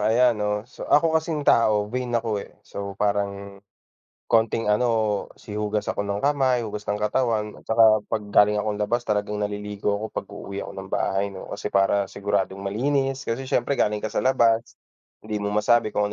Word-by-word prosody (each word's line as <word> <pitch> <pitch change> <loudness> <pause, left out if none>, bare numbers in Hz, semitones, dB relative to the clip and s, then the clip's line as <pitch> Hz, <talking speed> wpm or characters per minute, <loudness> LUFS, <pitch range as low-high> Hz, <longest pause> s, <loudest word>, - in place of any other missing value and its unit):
ayan, 115 +1 +3
oh, 105 0 0
so, 125 - -10
ako 160 +1 +4
kasing 155 -3 -3
tao 105 -3 +3
vain 125 -1 -2
ako, 110 -3 -1
eh, - - -9 0.2
so, 100 -1 -6
parang 100 -1 -2 0.7
konting, 115 -1 +2
ano, 110 -2 +1 0.2
si 105 -1 -8
hugas 105 0 -1
ako 100 - -1
ng 100 0 -2
kamay, 135 -4 +2
hugas 105 -2 -5
ng 105 0 -2
katawan, 105 -1 0
tsaka 110 -2 +5
pag 110 - -2
galing 105 +1 +4
akong 105 -1 -2
labas 120 +4 -1
talagang 105 0 -1
naliligo 105 0 -2
ako 105 - -5
pag-uuwi 100 0 -6
ako - - -7
ng 95 0 -7
bahay, 100 +1 0
no, 95 - -9
kasi - - -5
para 100 +1 +3
siguradong 100 -1 -1
malinis, 135 +7 -1
kasi 130 +3 -3
siyempre 120 +3 +1
galing 105 -6 0
ka 110 - -3
sa - - +1
labas, 115 -3 +2 0.5
hindi 105 -1 -3
mo 100 - -1
masabi 105 +2 +3
kung 105 -1 -1
105 Hz, 180 wpm, -24 LUFS, 105-115 Hz, 0.7 s, tsaka